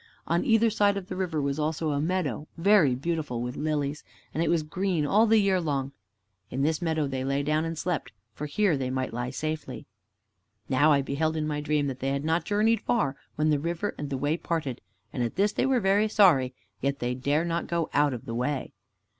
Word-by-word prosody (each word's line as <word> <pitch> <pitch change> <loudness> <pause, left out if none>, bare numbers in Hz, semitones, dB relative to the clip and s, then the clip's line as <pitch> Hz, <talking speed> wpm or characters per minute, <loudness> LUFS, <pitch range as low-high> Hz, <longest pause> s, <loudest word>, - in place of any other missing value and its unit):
On 170 +1 +1
either 225 0 +4
side 205 -2 +2
of 195 -1 -6
the 185 - -4
river 180 -4 -1
was 140 +1 -1
also 155 +1 -1
a 145 0 0
meadow, 155 -4 -1
very 170 -7 +4
beautiful 150 -3 -2
with 125 +2 -4
lilies, 150 -1 -2 0.3
and 160 - -1
it 170 - +1
was 165 -2 +2
green 180 0 -1
all 215 +9 +4
the 225 +1 +5
year 195 -3 +3
long. 140 -4 -1 0.6
In 135 +2 -2
this 155 +1 +1
meadow 160 -3 0
they 135 -2 -3
lay 140 +1 0
down 155 +2 +1
and 165 0 -4
slept, 165 - -2 0.2
for 150 +6 -5
here 185 +3 +2
they 130 -2 -2
might 130 -2 -2
lie 120 +1 -2
safely. 150 -5 -4 0.8
Now 145 +4 +4
I 140 -2 +3
beheld 155 +4 -1
in 155 - -1
my 150 -1 -2
dream 150 -1 +1
that 130 -2 -4
they 135 - -1
had 140 +2 -2
not 165 +2 +1
journeyed 215 +2 +2
far, 205 - 0 0.2
when 155 +1 +2
the 150 - +2
river 170 +6 -2
and 145 - -5
the 135 - -2
way 145 +5 0
parted, 160 -8 -3 0.3
and 125 - -2
at 120 -1 -1
this 200 +2 +2
they 255 - 0
were 265 -2 +3
very 200 +1 +3
sorry, 145 - +4 0.3
yet 140 +1 0
they 120 -1 -2
dare 145 +6 0
not 170 0 -2
go 170 -2 -1
out 145 -2 +3
of 120 - -9
the 115 - -5
way. 130 +4 -2
155 Hz, 220 wpm, -27 LUFS, 140-175 Hz, 0.8 s, the